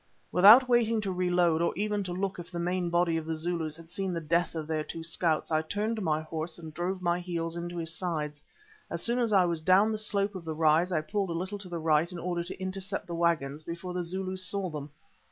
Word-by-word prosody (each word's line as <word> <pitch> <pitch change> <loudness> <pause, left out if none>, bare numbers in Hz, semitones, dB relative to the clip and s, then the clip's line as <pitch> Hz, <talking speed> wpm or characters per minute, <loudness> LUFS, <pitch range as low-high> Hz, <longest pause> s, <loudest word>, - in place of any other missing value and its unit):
Without 215 +8 +8
waiting 230 -2 +3
to 195 -2 -2
reload, 180 -2 +2
or 170 - 0
even 210 0 0
to 180 - -4
look 190 +1 -2
if 175 0 -8
the 175 - -6
main 175 +1 -1
body 170 -1 +2
of 160 -1 -5
the 160 - -1
Zulus 160 -1 -2
had 165 +1 -14
seen 190 0 -2
the 170 - -1
death 170 +2 0
of 160 -1 -3
their 155 0 -1
two 165 +1 -7
scouts, 165 -1 0
I 155 0 +3
turned 210 +7 -2
my 155 -4 +1
horse 160 +1 -4
and 160 -2 -9
drove 180 +3 -3
my 175 0 +1
heels 170 -2 -3
into 175 0 -5
his 165 -1 -1
sides. 155 -4 -3 0.5
As - - -2
soon 240 +1 +1
as 235 -3 +1
I 190 -3 +5
was 170 -2 -1
down 190 +6 +5
the 215 - -1
slope 205 -1 0
of 185 -3 -7
the 160 -1 -4
rise 160 +3 +3
I 160 -3 +1
pulled 195 +5 -2
a - - -2
little 185 +4 -4
to 190 -2 -9
the 175 - -3
right 160 +1 +2
in 180 - -6
order 175 0 -2
to 180 - -8
intercept 190 +1 -4
the 170 - -6
waggons 160 -4 0
before 170 +3 -6
the 180 - -1
Zulus 185 +2 -2
saw 190 -1 0
them. 150 -1 -6
175 Hz, 245 wpm, -29 LUFS, 165-190 Hz, 0.5 s, Without